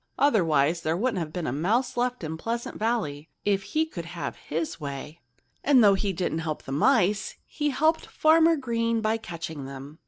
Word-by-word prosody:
Otherwise, 170 Hz, -, +3 dB
there 160 Hz, +1 st, 0 dB
wouldn't 225 Hz, -1 st, 0 dB
have 160 Hz, -3 st, -4 dB
been 175 Hz, 0 st, -4 dB
a -, -, -1 dB
mouse 205 Hz, -, 0 dB
left 245 Hz, -3 st, -1 dB
in 160 Hz, 0 st, -3 dB
Pleasant 230 Hz, +8 st, -4 dB
Valley—if 200 Hz, -3 st, -1 dB
he 310 Hz, +11 st, 0 dB
could 175 Hz, -, -7 dB
have 170 Hz, 0 st, -5 dB
had -, -, -21 dB
his 165 Hz, 0 st, -3 dB
way. 145 Hz, +1 st, -7 dB, 0.4 s
And 270 Hz, -4 st, +6 dB
though 200 Hz, -1 st, +7 dB
he 195 Hz, +1 st, 0 dB
didn't 175 Hz, -3 st, -2 dB
help 160 Hz, -2 st, -4 dB
the -, -, -8 dB
mice, 205 Hz, -, +2 dB
he 295 Hz, -1 st, -2 dB
helped 315 Hz, +4 st, +1 dB
Farmer 325 Hz, +1 st, +4 dB
Green 230 Hz, -4 st, 0 dB
by 220 Hz, +1 st, +1 dB
catching 165 Hz, -8 st, -6 dB
them. 140 Hz, +3 st, -9 dB
195 Hz, 185 wpm, -26 LUFS, 160-240 Hz, 0.4 s, though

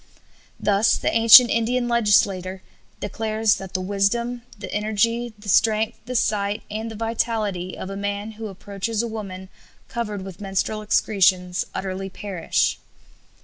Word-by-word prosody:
Thus 205 Hz, +2 st, +3 dB
the -, -, -1 dB
ancient 230 Hz, +2 st, +9 dB
Indian 240 Hz, +2 st, +1 dB
legislator 200 Hz, -5 st, +2 dB, 0.4 s
declares 215 Hz, +1 st, 0 dB
that 190 Hz, 0 st, -9 dB
"the 185 Hz, -, 0 dB
wisdom, 205 Hz, +6 st, 0 dB, 0.2 s
the 205 Hz, -, -7 dB
energy, 230 Hz, +3 st, 0 dB
the 210 Hz, 0 st, -14 dB
strength, 220 Hz, +3 st, +2 dB
the 250 Hz, -, -4 dB
sight, 205 Hz, -2 st, 0 dB
and 220 Hz, +2 st, -4 dB
the 220 Hz, -, -8 dB
vitality 215 Hz, -4 st, -2 dB
of 190 Hz, -, -6 dB
a -, -, -5 dB
man 200 Hz, +2 st, -3 dB
who 220 Hz, 0 st, -7 dB
approaches 205 Hz, +3 st, -4 dB
a -, -, -2 dB
woman 195 Hz, -4 st, -7 dB, 0.4 s
covered 210 Hz, -4 st, -4 dB
with 190 Hz, 0 st, -10 dB
menstrual 195 Hz, +2 st, -2 dB
excretions 185 Hz, -4 st, +2 dB
utterly 195 Hz, 0 st, -4 dB
perish." 190 Hz, -3 st, -1 dB
210 Hz, 140 wpm, -23 LUFS, 195-225 Hz, 0.4 s, ancient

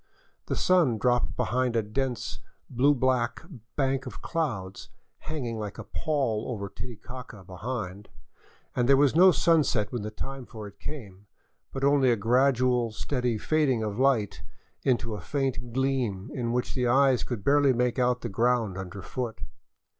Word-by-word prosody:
The -, -, -1 dB
sun 170 Hz, -11 st, +3 dB
dropped 125 Hz, +2 st, +1 dB
behind 125 Hz, -1 st, 0 dB
a 115 Hz, -, +2 dB
dense, 120 Hz, +2 st, -3 dB, 0.3 s
blue 135 Hz, +4 st, +4 dB
black 125 Hz, -2 st, 0 dB, 0.3 s
bank 135 Hz, -1 st, 0 dB
of -, -, -8 dB
clouds 110 Hz, -, -3 dB, 0.3 s
hanging 125 Hz, -8 st, -4 dB
like 105 Hz, -1 st, -5 dB
a -, -, -6 dB
pall 135 Hz, -9 st, -1 dB
over 100 Hz, -5 st, -4 dB
Titicaca 120 Hz, -1 st, -9 dB
behind, 100 Hz, +1 st, -5 dB, 0.7 s
and 125 Hz, +1 st, +1 dB
there 135 Hz, -, +7 dB
was 140 Hz, -1 st, +4 dB
no 185 Hz, +3 st, +8 dB
sunset 155 Hz, -, +2 dB
when 120 Hz, -, -3 dB
the 105 Hz, -, -4 dB
time 135 Hz, +4 st, -6 dB
for 110 Hz, -2 st, -8 dB
it 100 Hz, -1 st, -12 dB
came, 105 Hz, -7 st, -8 dB, 0.4 s
but 135 Hz, -, -5 dB
only 140 Hz, -2 st, +4 dB
a -, -, +4 dB
gradual, 125 Hz, +1 st, +2 dB
steady 125 Hz, 0 st, -1 dB
fading 135 Hz, -3 st, +1 dB
of 105 Hz, +1 st, -3 dB
light 130 Hz, -7 st, +2 dB, 0.4 s
to 120 Hz, -3 st, +1 dB
a 105 Hz, -, -5 dB
faint 135 Hz, 0 st, -2 dB
gleam 125 Hz, -7 st, -1 dB
in 120 Hz, -2 st, -2 dB
which 125 Hz, +1 st, -1 dB
the 125 Hz, -2 st, 0 dB
eyes 130 Hz, 0 st, +4 dB
could 115 Hz, -6 st, -4 dB
barely 140 Hz, +1 st, +4 dB
make 125 Hz, 0 st, +1 dB
out 125 Hz, 0 st, +2 dB
the -, -, -3 dB
ground 115 Hz, -2 st, +1 dB
underfoot. 100 Hz, +4 st, -5 dB
125 Hz, 155 wpm, -27 LUFS, 110-135 Hz, 0.7 s, no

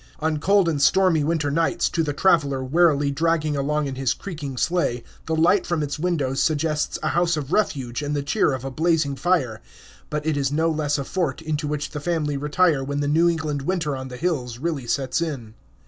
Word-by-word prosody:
On 155 Hz, -1 st, 0 dB
cold 195 Hz, +3 st, +3 dB
and 155 Hz, -4 st, 0 dB
stormy 175 Hz, 0 st, +4 dB
winter 155 Hz, -2 st, 0 dB
nights, 165 Hz, +3 st, +1 dB
to 165 Hz, -, 0 dB
the 155 Hz, -2 st, -1 dB
traveler 145 Hz, -4 st, +2 dB
wearily 145 Hz, 0 st, +3 dB
dragging 155 Hz, 0 st, 0 dB
along 150 Hz, +2 st, 0 dB
in 135 Hz, -, -3 dB
his 130 Hz, -1 st, 0 dB
creaking 150 Hz, -8 st, -6 dB
sleigh, 160 Hz, -7 st, 0 dB, 0.2 s
the 160 Hz, -, 0 dB
light 175 Hz, +5 st, +3 dB
from 170 Hz, -3 st, 0 dB
its 145 Hz, +1 st, -4 dB
windows 145 Hz, -6 st, 0 dB
suggests 155 Hz, -1 st, 0 dB
a -, -, +1 dB
house 175 Hz, -1 st, +1 dB
of 145 Hz, -1 st, -5 dB
refuge 135 Hz, -, 0 dB
and 145 Hz, 0 st, -2 dB
the 145 Hz, -, -1 dB
cheer 140 Hz, -, +2 dB
of 130 Hz, -1 st, -4 dB
a 135 Hz, -, -4 dB
blazing 155 Hz, -1 st, +1 dB
fire. 135 Hz, -7 st, 0 dB, 0.5 s
But 150 Hz, 0 st, -3 dB
it 155 Hz, -2 st, 0 dB
is 140 Hz, -1 st, 0 dB
no 160 Hz, +2 st, +1 dB
less 150 Hz, -2 st, 0 dB
a 140 Hz, -, -2 dB
fort, 180 Hz, +5 st, -2 dB
into 155 Hz, -2 st, -3 dB
which 150 Hz, 0 st, -3 dB
the 150 Hz, -, -5 dB
family 150 Hz, -2 st, -1 dB
retire 150 Hz, +1 st, +2 dB
when 140 Hz, +1 st, -2 dB
the 145 Hz, -, -1 dB
New 165 Hz, +4 st, +4 dB
England 155 Hz, -4 st, -2 dB
winter 165 Hz, -2 st, -1 dB
on 130 Hz, 0 st, -6 dB
the 125 Hz, -1 st, -8 dB
hills 130 Hz, -7 st, -2 dB
really 140 Hz, -3 st, -3 dB
sets 135 Hz, +4 st, 0 dB
in. 135 Hz, -10 st, -4 dB
150 Hz, 210 wpm, -23 LUFS, 140-165 Hz, 0.5 s, stormy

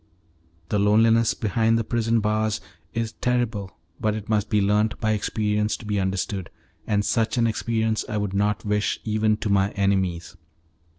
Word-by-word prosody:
The 105 Hz, -, +1 dB
loneliness 110 Hz, +2 st, +4 dB
behind 110 Hz, +1 st, +1 dB
the 115 Hz, -, 0 dB
prison 115 Hz, 0 st, +1 dB
bars 110 Hz, 0 st, 0 dB, 0.3 s
is 115 Hz, -1 st, -2 dB
terrible, 115 Hz, -5 st, -2 dB, 0.2 s
but 110 Hz, -1 st, 0 dB
it 110 Hz, -1 st, -7 dB
must 105 Hz, -1 st, +1 dB
be 105 Hz, -, +2 dB
learnt 105 Hz, +2 st, +1 dB
by 110 Hz, -1 st, +1 dB
experience 105 Hz, 0 st, 0 dB
to 115 Hz, -, -12 dB
be 105 Hz, -1 st, -1 dB
understood, 95 Hz, -1 st, -2 dB, 0.4 s
and 105 Hz, -1 st, +1 dB
such 115 Hz, +3 st, 0 dB
an 120 Hz, -, +3 dB
experience 110 Hz, -1 st, 0 dB
I 105 Hz, -, -2 dB
would 105 Hz, -2 st, -2 dB
not 105 Hz, +2 st, 0 dB
wish 105 Hz, 0 st, 0 dB
even 110 Hz, 0 st, +1 dB
to 105 Hz, -, -3 dB
my 100 Hz, 0 st, +3 dB
enemies. 95 Hz, -3 st, 0 dB
105 Hz, 165 wpm, -24 LUFS, 105-110 Hz, 0.4 s, loneliness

